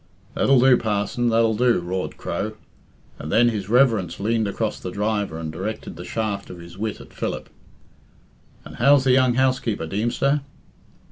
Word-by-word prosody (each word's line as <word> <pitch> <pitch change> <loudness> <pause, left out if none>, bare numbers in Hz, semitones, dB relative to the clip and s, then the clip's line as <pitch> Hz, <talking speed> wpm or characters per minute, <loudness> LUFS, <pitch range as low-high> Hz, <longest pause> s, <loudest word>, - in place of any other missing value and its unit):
"That'll 135 -2 +3
do, 130 0 +6
parson, 110 +3 -1
that'll 115 0 +3
do!" 120 -1 +2
roared 90 +1 -4
Crow. 110 +1 -3 0.7
And 75 - -6
then 120 +1 +5
his 105 -4 -4
reverence 110 -8 +2
leaned 110 +1 0
across 110 +2 -2
the 90 - -5
driver 105 -3 -2
and 80 -1 -5
directed 95 +7 -5
the - - -8
shaft 105 -3 -3
of 90 - -9
his 85 0 -12
wit 105 +2 -4
at - - -14
Philip. - - -4 1.1
"And - - -11
how's 140 +3 +5
the 135 - +3
young 130 -1 +4
housekeeper, 125 -8 0
Deemster?" 120 - 0
110 Hz, 160 wpm, -23 LUFS, 100-120 Hz, 1.1 s, do